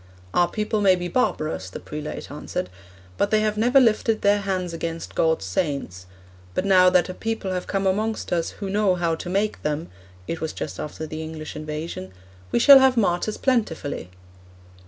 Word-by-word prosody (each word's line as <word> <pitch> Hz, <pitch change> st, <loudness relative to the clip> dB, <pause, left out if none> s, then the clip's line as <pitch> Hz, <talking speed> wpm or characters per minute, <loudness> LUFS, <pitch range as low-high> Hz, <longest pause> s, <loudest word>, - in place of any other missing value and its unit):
"Our 175 Hz, -, +4 dB
people 215 Hz, +1 st, -1 dB
may 190 Hz, -2 st, +5 dB
be 175 Hz, 0 st, -4 dB
barbarous," 160 Hz, -, -1 dB
the -, -, -7 dB
prelate 150 Hz, 0 st, -7 dB
answered, 90 Hz, -, -4 dB, 0.5 s
"but 200 Hz, -, +2 dB
they 215 Hz, 0 st, +3 dB
have 215 Hz, 0 st, 0 dB
never 245 Hz, +5 st, +4 dB
lifted 225 Hz, -2 st, +2 dB
their 205 Hz, +1 st, +4 dB
hands 185 Hz, -3 st, -2 dB
against 165 Hz, 0 st, -5 dB
God's 160 Hz, -10 st, +1 dB
saints; 95 Hz, -, -3 dB, 0.5 s
but 185 Hz, -, 0 dB
now 185 Hz, -2 st, +6 dB
that 180 Hz, -2 st, +3 dB
a 185 Hz, -, -5 dB
people 225 Hz, -2 st, -3 dB
have 180 Hz, -1 st, -3 dB
come 195 Hz, -1 st, -1 dB
amongst 215 Hz, +1 st, 0 dB
us 170 Hz, -1 st, 0 dB
who 200 Hz, -, -4 dB
know 200 Hz, -1 st, +2 dB
how 170 Hz, -2 st, 0 dB
to 170 Hz, +2 st, -5 dB
make 200 Hz, +3 st, -1 dB
them 150 Hz, +2 st, -2 dB, 0.4 s
(it 165 Hz, -, -4 dB
was 160 Hz, -, -3 dB
just -, -, -6 dB
after 150 Hz, +1 st, -5 dB
the 155 Hz, 0 st, -6 dB
English 155 Hz, -1 st, -7 dB
invasion), 155 Hz, -, -5 dB, 0.4 s
we -, -, +2 dB
shall 275 Hz, +3 st, +9 dB
have 265 Hz, -1 st, +4 dB
martyrs 200 Hz, 0 st, +1 dB
plentifully."' 175 Hz, -, -1 dB
180 Hz, 180 wpm, -24 LUFS, 160-210 Hz, 0.5 s, shall